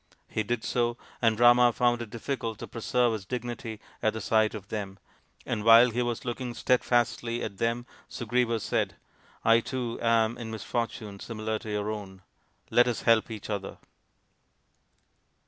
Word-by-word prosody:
He 110 - -2
did 110 +2 -2
so, 120 -1 0 0.2
and 115 -2 +3
Rama 120 0 +7
found 120 0 +1
it 115 - -6
difficult 115 -1 -4
to - - -7
preserve 120 +1 +1
his 110 -3 -4
dignity 120 -2 -5 0.2
at 110 - +2
the 110 - -4
sight 110 +1 +2
of 100 -2 -9
them; 100 -3 -4 0.5
and 105 - -2
while 115 +2 +8
he 120 +2 0
was 120 -1 -2
looking 120 0 -4
steadfastly 120 -1 +1
at 100 -3 -6
them 115 +1 0 0.2
Sugriva 120 0 0
said, - - -1 0.3
" - - -30
I 115 0 +6
too 120 -1 -4
am 115 0 +2
in 115 -2 -5
misfortune 110 -2 -4
similar 110 -1 -3
to 110 - -9
your 105 0 -1
own. 95 -3 -8 0.5
Let 120 0 +5
us 120 - -2
help 115 0 +4
each 110 -3 -7
other." 100 -2 -4
115 Hz, 165 wpm, -28 LUFS, 110-120 Hz, 0.5 s, while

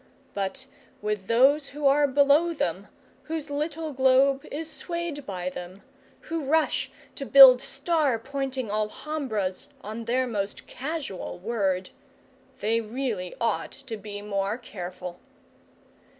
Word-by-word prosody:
But 200 +7 -3 0.3
with 210 -2 -3
those 270 +5 +4
who 295 +1 -5
are 285 +1 +5
below 285 +5 +4
them, - - -2 0.4
whose 310 -2 -4
little 305 +1 -3
globe 265 +1 +4
is 315 +2 -3
swayed 335 -3 -4
by 185 -2 -3
them, 180 +2 -9 0.4
who 325 -1 -4
rush 315 +3 +1 0.2
to 280 - -6
build 265 -2 +9
star 285 -3 +1
pointing 265 -1 -3
alhambras 215 -2 -2
on 220 +3 -6
their 255 +3 +1
most 205 -4 -3
casual 280 - -5
word, 190 -2 -1 0.7
they 225 +3 +2
really 220 -5 -3
ought 230 - -1
to 260 -4 -7
be 205 -1 -7
more 200 +1 -1
careful. 180 -6 -7
255 Hz, 120 wpm, -26 LUFS, 205-285 Hz, 0.7 s, build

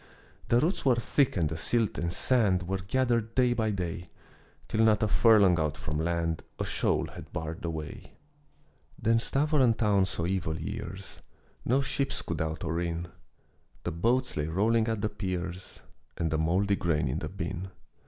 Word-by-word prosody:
The 120 - +4
roots 165 +8 0
were 130 -3 +4
thick 125 +1 +1
and 80 -3 +2
the 80 - -4
silt 110 +6 0
and 85 0 -1
sand 100 -4 +2
Were 95 +2 -2
gathered 115 +3 0
day 125 -1 +4
by 110 -2 0
day, 90 -3 -3 0.6
Till 110 - +1
not 110 -1 +4
a - - +3
furlong 100 -5 +5
out 75 -2 -1
from 75 0 -3
land 85 -1 -1 0.2
A - - -2
shoal - - 0
had - - -11
barred 80 0 -5
the 85 - -2
way. 80 -2 -6 0.9
Then 115 +1 +3
Stävoren 135 -2 +2
town 100 -4 +3
saw 85 - -3
evil 85 -4 -1
years, 80 - -6 0.5
No 130 +4 +3
ships 140 +1 -1
could 85 -2 -3
out 80 0 -3
or 85 0 -1
in. 85 0 -3 0.7
The 90 - -2
boats 120 +10 +1
lay 75 -1 -1
rolling 110 +7 +2
at 110 -2 -1
the 110 - 0
piers, 90 -3 -5 0.4
And 80 -2 -1
the 80 - +1
mouldy 95 +5 +2
grain 75 -5 0
in 70 +5 -1
the 75 - -4
bin. 95 0 -5
95 Hz, 175 wpm, -29 LUFS, 85-115 Hz, 0.9 s, furlong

